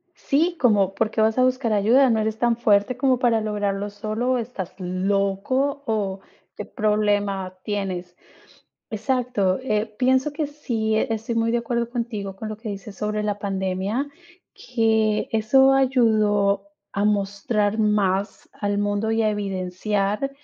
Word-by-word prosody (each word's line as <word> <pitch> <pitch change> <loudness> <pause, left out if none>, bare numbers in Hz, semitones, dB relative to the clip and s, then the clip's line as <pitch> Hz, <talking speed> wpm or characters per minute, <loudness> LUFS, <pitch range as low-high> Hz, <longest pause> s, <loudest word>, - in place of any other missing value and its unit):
Sí, 330 +5 0
como, 205 -6 +3
¿por 215 +2 0
qué 220 - 0
vas 220 +1 +2
a 255 - +4
buscar 255 -3 +1
ayuda? 240 +7 +4
¿No 225 -2 +2
eres 220 0 -1
tan 240 0 +2
fuerte 215 +2 +2
como 260 0 +2
para 235 -3 +2
lograrlo 205 -1 -2
solo 215 +5 -2
o - - +1
estás 225 -6 -5
loco 200 +9 -1
o 205 -5 -1 0.4
qué 210 - -6
problema 205 -3 0
tienes? 185 -4 -4 0.8
Exacto, 225 -4 0
eh, 215 -4 0
pienso 260 +3 +2
que 305 0 -1
sí, 235 -7 -2
estoy 225 0 -1
muy 230 0 +1
de 240 - +2
acuerdo 235 0 -2
contigo 225 -5 -4
con 215 +3 -6
lo 215 - -6
que 220 0 -7
dices 200 0 -7
sobre 210 0 -2
la 205 -1 -2
pandemia, 195 +5 -2 0.5
que 220 -3 +1
eso 265 +5 +4
ayudó 215 -6 +2 0.2
a 200 +1 0
mostrar 205 +1 0
más 205 -2 0
al 205 -1 -2
mundo 205 +2 0
y 225 0 +1
a 215 - +3
evidenciar 200 +3 -2
215 Hz, 150 wpm, -23 LUFS, 200-235 Hz, 0.8 s, a